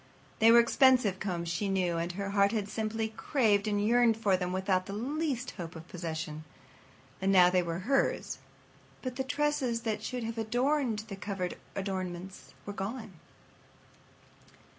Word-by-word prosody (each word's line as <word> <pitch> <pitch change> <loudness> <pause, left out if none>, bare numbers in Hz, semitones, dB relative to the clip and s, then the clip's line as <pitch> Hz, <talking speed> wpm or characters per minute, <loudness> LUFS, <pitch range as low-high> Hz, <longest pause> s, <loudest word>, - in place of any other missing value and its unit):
They 225 +1 +7
were 235 - +8
expensive 235 -5 +4
combs, 175 -4 -3
she 175 +4 -1
knew, 180 -3 +1
and 170 +1 -2
her 200 +1 -4
heart 200 +1 +3
had 210 -3 -1
simply 220 +1 -2
craved 220 -2 +1
and 205 -1 +1
yearned 235 -1 +4
over 205 -4 +2
them 180 -1 -2
without 185 0 0
the 200 - -5
least 260 +2 -2
hope 175 -3 -8
of 160 +1 -10
possession. 160 -3 -5 0.8
And 195 +1 +2
now, 180 -2 +7
they 180 0 +3
were 170 -1 -3
hers, 270 +2 +1 0.6
but 255 -1 -4
the 265 - -1
tresses 270 -4 0
that 220 -2 -2
should 245 +2 -4
have 225 0 -4
adorned 245 0 0
the 200 - -6
coveted 195 -2 -4 0.2
adornments 190 -1 -5
were 205 - -5
gone. 210 +2 -5
205 Hz, 160 wpm, -30 LUFS, 185-235 Hz, 0.8 s, were